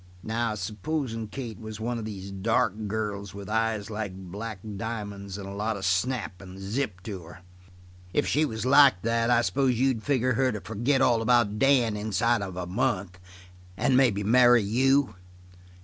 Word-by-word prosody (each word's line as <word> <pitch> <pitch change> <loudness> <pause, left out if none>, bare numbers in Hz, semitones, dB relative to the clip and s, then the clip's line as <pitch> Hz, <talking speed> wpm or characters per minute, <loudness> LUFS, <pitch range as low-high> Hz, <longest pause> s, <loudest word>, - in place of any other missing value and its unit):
"Now, 115 0 -1
supposin' 110 - -3
Kate 115 -1 -7
was 110 -1 -8
one 120 +1 -2
of 110 - -5
these 100 -2 -7
dark 110 +3 +1
girls 100 -2 -4
with 100 -1 -8
eyes 110 -1 -1
like 105 -3 -4 0.2
black 110 +2 -5 0.2
diamonds 100 -2 -5
and 100 -1 -7
a 100 - -7
lot 105 +2 -2
of 95 - -5
snap 95 +1 -1
and 95 -1 -11
zip 100 -2 -3
to 100 -4 -6
her. 90 +2 -13 0.7
If 145 - +1
she 150 - +2
was 110 -6 -3
like 135 -7 +6
that 115 +1 +1
I 120 -1 +4
s'pose 130 -2 +1
you'd 130 -3 +2
figure 130 -1 +1
her 130 +2 +2
to 105 - -4
forget 120 +7 0
all 115 -2 +3
about 115 -3 +2
Dan 125 -5 +3
inside 110 +2 +1
of 95 -2 -5
a 90 - -3
month 95 -3 -1 0.6
and 130 - +2
maybe 120 -6 +3
marry 120 +1 +5
you?" 130 +3 +2
110 Hz, 175 wpm, -27 LUFS, 100-125 Hz, 0.7 s, like